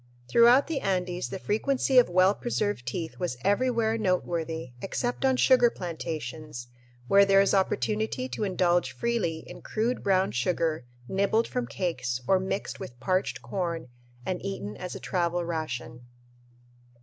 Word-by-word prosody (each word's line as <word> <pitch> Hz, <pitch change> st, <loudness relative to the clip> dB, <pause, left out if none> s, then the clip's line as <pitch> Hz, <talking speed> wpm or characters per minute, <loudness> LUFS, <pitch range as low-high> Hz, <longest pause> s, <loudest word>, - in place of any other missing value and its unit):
Throughout 240 Hz, -, +6 dB
the 310 Hz, -3 st, -2 dB
Andes 180 Hz, -4 st, -1 dB
the -, -, -4 dB
frequency 255 Hz, +6 st, +2 dB
of 245 Hz, -, +3 dB
well 185 Hz, +2 st, +4 dB
preserved 205 Hz, -, -2 dB
teeth 160 Hz, +6 st, -4 dB
was 175 Hz, -9 st, -2 dB
everywhere 225 Hz, +1 st, +2 dB
noteworthy 165 Hz, -7 st, -1 dB
except 245 Hz, +6 st, -2 dB
on 265 Hz, -1 st, +3 dB
sugar 250 Hz, -2 st, +5 dB
plantations, 155 Hz, -, -6 dB, 0.4 s
where 200 Hz, +6 st, +6 dB
there 195 Hz, 0 st, +5 dB
is 195 Hz, -, +3 dB
opportunity 215 Hz, +5 st, 0 dB
to 240 Hz, -, -4 dB
indulge 175 Hz, -7 st, +1 dB
freely 170 Hz, -, -1 dB
in -, -, -11 dB
crude 230 Hz, +3 st, -1 dB
brown 190 Hz, -, +2 dB
sugar 155 Hz, +3 st, 0 dB, 0.2 s
nibbled 200 Hz, -, +1 dB
from 250 Hz, -1 st, -3 dB
cakes 125 Hz, -10 st, -2 dB
or 190 Hz, -, +4 dB
mixed 190 Hz, +1 st, -3 dB
with 120 Hz, -1 st, -9 dB
parched 185 Hz, +7 st, -1 dB
corn 170 Hz, -7 st, -3 dB, 0.4 s
and 185 Hz, -1 st, -3 dB
eaten 150 Hz, -, -4 dB
as 180 Hz, -, -6 dB
a -, -, -6 dB
travel 175 Hz, -1 st, -1 dB
ration. 125 Hz, -8 st, -4 dB
185 Hz, 145 wpm, -27 LUFS, 160-220 Hz, 0.4 s, Throughout